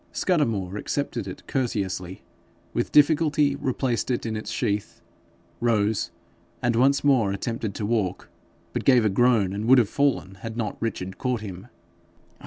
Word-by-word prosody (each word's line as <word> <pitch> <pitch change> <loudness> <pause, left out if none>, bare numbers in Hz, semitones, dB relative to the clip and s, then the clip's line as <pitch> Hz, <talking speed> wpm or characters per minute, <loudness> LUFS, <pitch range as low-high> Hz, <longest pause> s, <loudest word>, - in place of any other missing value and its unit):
Scudamore 110 - 0
accepted 145 +6 -3
it - - -8
courteously, 95 -8 -2 0.5
with - - -1
difficulty 150 -1 +4
replaced 130 -4 -1
it 125 -2 -1
in 110 -1 -2
its 110 - -5
sheath, 105 0 -2 0.6
rose, 110 -3 +1 0.5
and 120 -2 +1
once 140 +4 +3
more 130 -8 +3
attempted 110 0 -3
to 105 - -3
walk, 105 -4 -1 0.5
but - - -2
gave 125 -4 +5
a - - +4
groan, 105 -2 +3
and 105 +2 -3
would 130 +2 +7
have 120 -4 +4
fallen 130 -10 0
had 115 0 -6
not 110 -3 -3
Richard 95 -5 -4
caught 125 -3 -1
him. 95 -4 -8
115 Hz, 150 wpm, -25 LUFS, 100-130 Hz, 0.6 s, would